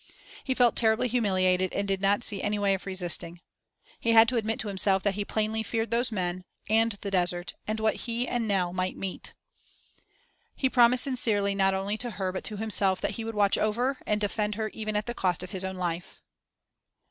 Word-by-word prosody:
He 260 Hz, -, -1 dB
felt 245 Hz, -2 st, +4 dB
terribly 220 Hz, +2 st, +2 dB
humiliated 185 Hz, -6 st, +1 dB
and 200 Hz, 0 st, -2 dB
did 195 Hz, -1 st, -1 dB
not 200 Hz, +3 st, +2 dB
see 200 Hz, -4 st, -2 dB
any 210 Hz, 0 st, -1 dB
way 200 Hz, -1 st, +2 dB
of 190 Hz, 0 st, -5 dB
resisting. 175 Hz, -2 st, 0 dB, 0.6 s
He 230 Hz, -, +1 dB
had 225 Hz, 0 st, +7 dB
to 255 Hz, -, -3 dB
admit 225 Hz, -1 st, -1 dB
to 215 Hz, -, -5 dB
himself 195 Hz, -1 st, +2 dB
that 200 Hz, -, +1 dB
he 205 Hz, +1 st, -2 dB
plainly 220 Hz, +1 st, -1 dB
feared 225 Hz, +1 st, -3 dB
those 235 Hz, +1 st, +1 dB
men 185 Hz, -3 st, -3 dB, 0.2 s
and 225 Hz, +1 st, +3 dB
the 200 Hz, -, -4 dB
desert, 175 Hz, -1 st, -1 dB
and 215 Hz, +1 st, -2 dB
what 220 Hz, 0 st, +1 dB
he 235 Hz, +2 st, -1 dB
and 240 Hz, -2 st, -1 dB
Nell 185 Hz, -4 st, 0 dB
might 185 Hz, 0 st, -2 dB
meet. 190 Hz, -1 st, -6 dB, 1.2 s
He 265 Hz, -1 st, 0 dB
promised 245 Hz, 0 st, +5 dB
sincerely 215 Hz, -7 st, +1 dB
not 195 Hz, -1 st, +2 dB
only 200 Hz, +3 st, -2 dB
to 245 Hz, -, -3 dB
her 190 Hz, -2 st, -1 dB
but 185 Hz, -, -5 dB
to 210 Hz, -, -3 dB
himself 200 Hz, -3 st, +2 dB
that -, -, -1 dB
he 225 Hz, +3 st, -5 dB
would 225 Hz, 0 st, -5 dB
watch 200 Hz, -1 st, +3 dB
over 245 Hz, +5 st, 0 dB
and 210 Hz, 0 st, +1 dB
defend 210 Hz, 0 st, -1 dB
her 215 Hz, 0 st, -2 dB
even 215 Hz, 0 st, -5 dB
at 210 Hz, 0 st, 0 dB
the 240 Hz, -, -3 dB
cost 180 Hz, -5 st, -1 dB
of 180 Hz, -, -8 dB
his 190 Hz, -1 st, -2 dB
own 190 Hz, 0 st, -4 dB
life. 175 Hz, -1 st, -4 dB
205 Hz, 210 wpm, -27 LUFS, 190-225 Hz, 1.2 s, had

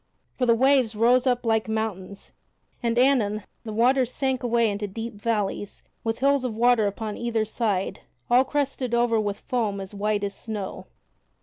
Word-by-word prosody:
For 250 Hz, -, 0 dB
the 235 Hz, -, +5 dB
waves 260 Hz, -2 st, +3 dB
rose 245 Hz, +4 st, +3 dB
up 245 Hz, -1 st, +1 dB
like 220 Hz, -1 st, +1 dB
mountains, 200 Hz, -3 st, -4 dB, 0.5 s
and 235 Hz, 0 st, 0 dB
anon 235 Hz, -6 st, +3 dB, 0.2 s
the 220 Hz, -, -6 dB
waters 250 Hz, +3 st, +2 dB
sank 265 Hz, -2 st, -1 dB
away 235 Hz, -1 st, +2 dB
into 205 Hz, 0 st, -2 dB
deep 225 Hz, +4 st, -6 dB
valleys 205 Hz, -2 st, -3 dB, 0.2 s
with 225 Hz, 0 st, -1 dB
hills 280 Hz, -1 st, +3 dB
of 245 Hz, -4 st, -3 dB
water 235 Hz, -2 st, +4 dB
upon 210 Hz, +1 st, -4 dB
either 230 Hz, -2 st, -1 dB
side 210 Hz, -4 st, -1 dB, 0.3 s
all 245 Hz, +2 st, +5 dB
crested 270 Hz, -3 st, -1 dB
over 235 Hz, -1 st, +2 dB
with 205 Hz, -1 st, -2 dB
foam 220 Hz, -5 st, -1 dB
as 195 Hz, +1 st, -8 dB
white 205 Hz, 0 st, -1 dB
as 200 Hz, 0 st, -2 dB
snow. 210 Hz, -2 st, -6 dB
225 Hz, 170 wpm, -25 LUFS, 210-245 Hz, 0.5 s, the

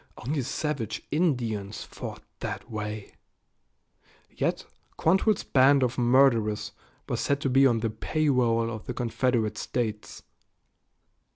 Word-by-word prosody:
Only 140 Hz, +5 st, -2 dB
savage 130 Hz, -4 st, -3 dB
Indians 120 Hz, -, -1 dB
fought -, -, -8 dB, 0.2 s
that -, -, -5 dB
way. 105 Hz, -1 st, -5 dB, 1.2 s
Yet -, -, -1 dB, 0.3 s
Quantrell's 190 Hz, +5 st, +2 dB
band 135 Hz, +1 st, +4 dB
of 125 Hz, +1 st, 0 dB
murderers 120 Hz, -4 st, +3 dB, 0.4 s
was -, -, -2 dB
said 140 Hz, 0 st, +1 dB
to 135 Hz, -, 0 dB
be 135 Hz, +1 st, +6 dB
on 115 Hz, -3 st, +1 dB
the 115 Hz, -1 st, -1 dB
payroll 115 Hz, -2 st, +1 dB
of 110 Hz, +1 st, -7 dB
the 125 Hz, -, -4 dB
Confederate 115 Hz, -3 st, 0 dB
States. 110 Hz, -4 st, -3 dB
120 Hz, 115 wpm, -27 LUFS, 110-135 Hz, 1.2 s, be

